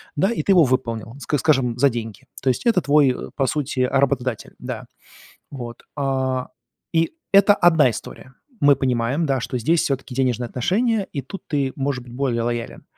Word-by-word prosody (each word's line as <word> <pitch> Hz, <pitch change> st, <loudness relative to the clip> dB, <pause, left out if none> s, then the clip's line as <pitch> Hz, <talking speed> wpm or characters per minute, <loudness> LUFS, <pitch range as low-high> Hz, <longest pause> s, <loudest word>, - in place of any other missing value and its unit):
Да, 190 Hz, +8 st, +2 dB
и 235 Hz, -, -1 dB
ты 195 Hz, -, +4 dB
его 175 Hz, -3 st, +6 dB
выполнил, 115 Hz, -3 st, -1 dB
ска 145 Hz, +3 st, -1 dB
скажем, 130 Hz, -4 st, +2 dB
за 140 Hz, +3 st, +4 dB
деньги. 115 Hz, 0 st, -6 dB, 0.2 s
То 130 Hz, -, +1 dB
есть 125 Hz, -, -1 dB
это 230 Hz, -6 st, +3 dB
твой, 145 Hz, -2 st, +4 dB
э, 125 Hz, -, -4 dB
по 135 Hz, -2 st, +1 dB
сути, 140 Hz, -3 st, -1 dB
а, 125 Hz, +2 st, +2 dB
работодатель, 130 Hz, -4 st, -1 dB
да. -, -, -6 dB, 0.7 s
Вот, 120 Hz, -4 st, -8 dB
o 130 Hz, -2 st, -1 dB, 0.4 s
и 165 Hz, 0 st, +1 dB, 0.2 s
это 200 Hz, +1 st, +7 dB
одна 165 Hz, -7 st, +5 dB
история. 130 Hz, +4 st, -9 dB, 0.3 s
Мы 145 Hz, -1 st, +6 dB
понимаем, 130 Hz, +4 st, 0 dB
да, 135 Hz, -4 st, 0 dB
что 125 Hz, -, -4 dB
здесь 160 Hz, +8 st, +2 dB
всё-таки 135 Hz, -2 st, -2 dB
денежные 125 Hz, -2 st, 0 dB
отношения, 200 Hz, -, 0 dB
и 140 Hz, -, -2 dB
тут 185 Hz, +10 st, -9 dB
ты 140 Hz, -3 st, -1 dB
может 135 Hz, -2 st, -2 dB
быть 120 Hz, -, -13 dB
более 125 Hz, -2 st, -1 dB
лоялен. 120 Hz, 0 st, -4 dB
135 Hz, 185 wpm, -22 LUFS, 125-150 Hz, 0.7 s, это